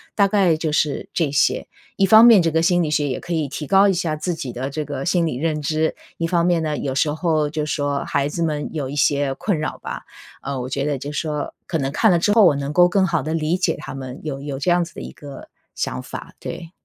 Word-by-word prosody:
大 200 -2 +4
概 190 -5 +3
就 155 -1 -2
是 150 -2 0
这 160 -5 +1
些。 145 - +1 0.3
一 195 - +4
方 220 +4 +8
面 230 -5 +8
这 165 -1 +1
个 160 +1 +2
心 175 +1 +3
理 150 - -2
学 150 -1 +1
也 130 - -3
可 175 - -8
以 160 -3 0
提 150 +2 -6
高 195 +3 +5
一 195 - +3
下 165 -3 -1
自 170 +2 -2
己 135 -6 -5
的 130 +3 -4
这 150 +2 -3
个 140 -2 -5
心 175 -1 +2
理 140 -6 -2
认 155 0 -1
知。 155 +2 0 0.2
一 165 - -1
方 170 0 +1
面 175 -2 +2
呢， 150 -2 -2
有 135 -2 -3
时 150 +2 +1
候 155 -2 0
就 155 -1 -2
说 145 -1 -1
孩 140 0 0
子 165 +3 -2
们 150 -2 -2
有 140 -4 -3
一 145 - -6
些 140 -1 +2
困 200 -7 -1
扰 155 - -3
吧， - - -6 0.4
呃， 140 -2 -4
我 125 - -4
觉 135 +1 -2
得 145 -1 -1
就 145 +3 -6
说， 150 -1 -3
可 165 - -1
能 135 -2 -1
看 220 +4 +4
了 175 - +3
之 205 +4 +2
后 220 -2 +6
我 160 -6 +5
能 140 +1 -4
够 175 +2 +5
更 190 0 +2
好 170 -2 0
地 160 +1 -3
理 160 +2 0
解 185 - 0
他 - - -7
们 130 -1 -7
有 135 -3 -4
有 140 -1 -5
这 145 - 0
样 175 0 +3
子 170 0 -10
的 - - -9
一 - - -8
个 145 -3 -11 0.3
想 65 - -3
法， - - -8
对。 170 -1 -7
155 Hz, 290 characters per minute, -21 LUFS, 145-175 Hz, 0.4 s, 方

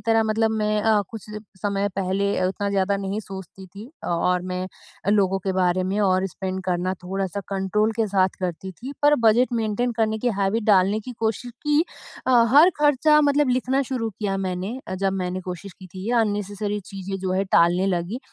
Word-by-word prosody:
तरह 225 -1 +2
मतलब 220 +1 +2
मैं 215 -1 0
अ, 220 -1 +4
कुछ 225 -3 -9 0.4
समय 200 0 0
पहले 195 +1 0 0.2
उतना 200 +2 -2
ज़्यादा 200 0 +1
नहीं 195 +1 -3
सोचती 190 -1 -10
थी 205 +7 -11
और 180 +1 +1
मैं 180 0 -3 0.4
अ, 200 - +1
लोगों 195 -2 +3
के 190 - 0
बारे 180 0 +2
में 205 - 0
और 185 +1 +2
स्पेंड 190 0 -5
करना 180 0 -1
थोड़ा-सा 195 +1 -3
कंट्रोल 200 +3 0
के 220 - +2
साथ 185 0 +5
करती 185 +1 -4
थी 250 +9 -8
पर 295 +1 +6
बजट 245 +4 +3
मैन्टेन 225 +3 -1
करने 220 0 +1
की 245 - 0
हैबिट 200 +3 +1
डालने 195 +2 +3
की 250 +4 -8
कोशिश 225 +2 -2 0.2
की। 295 +1 +4 0.5
अ, 260 - +2 0.2
हर 320 +6 +8 0.2
ख़र्चा 300 +2 +4
मतलब 290 -1 +3
लिखना 255 +2 +1
शुरू 250 -3 -2
किया 200 -1 -3
मैंने 190 +5 -3
अ, 185 - -3
जब 195 +1 0
मैंने 185 -1 -2
कोशिश 180 +2 -6
की 185 - -13
थी, 185 +1 -9
ये 240 - 0
अननेसेसरी 205 -1 -1
चीज़ें 195 -1 -5
जो 185 -1 -1
हैं 190 +1 +1
टालने 175 +3 +4
लगी। 180 +5 -1
200 Hz, 195 wpm, -23 LUFS, 185-220 Hz, 0.5 s, हर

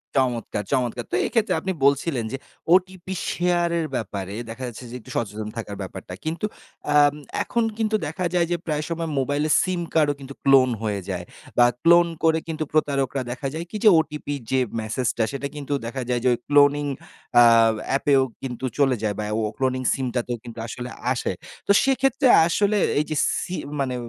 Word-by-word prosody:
চমৎকার, 120 -5 0
চমৎকার! 125 -3 0
তো - - +1
এক্ষেত্রে 225 -3 +1
আপনি 190 - -2
বলছিলেন 140 -3 +2
যে, 135 - -3 0.4
ওটিপি 185 0 +1 0.2
শেয়ারের 175 -1 +1
ব্যাপারে 100 -3 -4
দেখা 115 +3 -7
যাচ্ছে 120 +1 -8
যে - - -7
একটু 110 - -16
সচেতন 105 -1 -3
থাকার 105 -3 -5
ব্যাপারটা। 95 -1 -7
কিন্তু 165 +6 -2 0.5
আম 145 -1 +6 0.3
এখন 235 - 0
কিন্তু 220 -1 +1
দেখা 185 - -3
যায় 175 -2 +2
যে, 175 - +2
প্রায় 150 -2 -1
সময় 165 -1 -3
মোবাইলের 145 +3 +1
সিম 185 -2 -1
কার্ডও 150 -3 +3
কিন্তু 140 0 -9
ক্লোন 135 -2 +6
হয়ে 105 -2 -1
যায় 90 -2 -3 0.3
বা 120 - +7 0.2
ক্লোন 170 +1 +6 0.2
করে 160 0 +4
কিন্তু 160 -1 -2
প্রতারকরা 140 -3 +1
দেখা 130 +3 -4
যায় 165 +2 -4
কি? - - -9
যে 215 - +9
ওটিপি 150 -2 -3 0.2
যে 130 - +3 0.2
মেসেজটা 115 +1 -1
সেটা 140 0 -3
কিন্তু 145 -1 -4
দেখা 130 +3 -4
যায় 125 -1 +1
যে - - +2
ওই 120 - -1
ক্লোনিং 145 0 +4 0.6
আ - - +9 0.5
অ্যাপেও 135 0 +3 0.2
কিন্তু 130 -1 -5
চলে 135 -3 +3
যায় 105 -2 0
বা - - -1
ও - - 0 0.2
ক্লোনিং 130 -1 0
সিমটাতেও 125 -2 -2
কিন্তু 120 -1 -9
আসলে 125 +1 -6 0.2
আসে। 125 - -1 0.4
তো - - +5
সেক্ষেত্রে 270 0 +2 0.2
আসলে 205 +4 +2 0.2
এইযে 155 +1 -2 0.3
সি 180 - -4 0.2
মানে 130 -2 -1
140 Hz, 175 wpm, -23 LUFS, 120-165 Hz, 0.6 s, যে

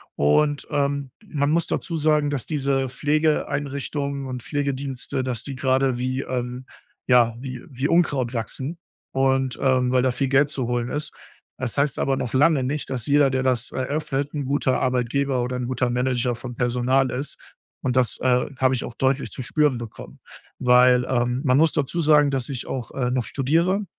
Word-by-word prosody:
Und, 145 - +2
ähm, 140 -2 -1 0.2
man 145 -4 0
muss 165 0 +1
dazu 165 - -2
sagen, 150 -1 +2
dass 140 -4 -3
diese 135 -3 0
Pflegeeinrichtungen 145 -1 -1
und 130 -1 -5
Pflegedienste, 135 -1 -3
dass 125 -3 -3
die 140 - -6
gerade 130 -1 +1
wie, 130 +1 -1
ähm 125 0 -4 0.4
ja, 120 -2 +5
wie 130 -1 -7
wie 135 +2 -2
Unkraut 140 -8 +2
wachsen 130 +7 -4 0.4
und, 135 -1 +1
ähm, 130 -2 +2
weil 125 -1 +3
da 130 - +2
viel 130 +2 -1
Geld 140 +2 +3
zu 130 -5 -3
holen 120 0 -1
ist. 150 +1 -4 0.5
Das 130 -1 -3
heißt 140 -1 +1
aber 135 -1 +1
noch 120 - -4
lange 145 +1 +4
nicht, 145 +2 -3
dass 125 -4 -3
jeder, 145 -1 +4
der 130 0 0
das 125 -2 0
eröffnet, 140 +1 -2
'n 145 -2 -2
guter 135 -1 +1
Arbeitgeber 130 +1 0
oder 125 +1 -3
'n 125 -1 -3
guter 130 -1 0
Manager 125 0 0
von 120 +1 -8
Personal 125 +2 +1
ist 135 +4 -4 0.4
und 125 -1 -1
das, 125 -2 +1
äh, 125 -1 +2
habe 130 0 +3
ich 125 - -3
auch 120 - -7
deutlich 135 +1 0
zu - - -5
spüren 150 0 +2
bekommen, 115 -2 -9 0.4
weil, 125 0 +5
ähm, 125 0 0
man 130 +1 +4
muss 160 0 +4
dazu 155 +4 -1
sagen, 150 -2 +5
dass 130 0 -2
ich 130 -3 -5
auch, 125 -4 -5
äh, 125 -2 -1
noch 125 -2 0
studiere 170 +9 +1
130 Hz, 185 wpm, -23 LUFS, 125-145 Hz, 0.5 s, ja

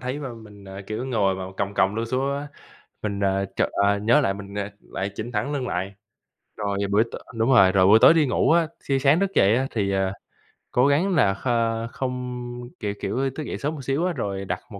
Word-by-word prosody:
thấy 130 +3 -3
mà 130 -5 -6
mình, 105 -3 -14
à, 95 0 -8
kiểu, 110 +4 -4
ngồi 100 -7 +1
mà 95 - -5
còng 100 0 -2
còng 95 +1 +2
lưng 115 +1 -2
xuống 135 +3 -1
á, 145 +1 -6 0.5
mình, 100 -2 -3
à, 95 0 +1
chợt - - +2
ờ, 100 0 +2
nhớ 110 +4 +4
lại 95 0 0
mình, 100 0 -9
à, 105 0 -3
lại 95 +2 -5
chỉnh 115 +4 -6
thẳng 115 +7 -1
lưng 135 -3 -2
lại. 95 +3 -3 0.6
Rồi 100 -2 -2
buổi 105 +3 +4
t - - -12 0.3
đúng 115 +2 +1
rồi. 100 -8 +6
Rồi 95 -1 +4
buổi 110 +2 +7
tối - - +9
đi 160 -2 +3
ngủ 135 - +2
á, 165 -1 +4 0.2
thi 135 -1 +2
sáng 140 +4 +4
thức 195 0 0
dậy 100 +3 +5
á 130 +2 0
thì, 100 -3 -1
ờ, 95 -1 0 0.6
cố 125 +3 +3
gắng 170 +6 +2
là 105 -10 +4
kh 115 0 -1
không, 125 -1 -4 0.4
kiểu, 105 -3 -2
kiểu, 130 +7 -1
thức 155 - -4
dậy - - -5
sớm 150 +3 -2
một 145 - -7
xíu 135 +6 0
á 180 - 0
rồi 100 -7 -3
đặt 95 +1 -3
một 100 -2 -9
115 Hz, 240 wpm, -24 LUFS, 100-135 Hz, 0.6 s, tối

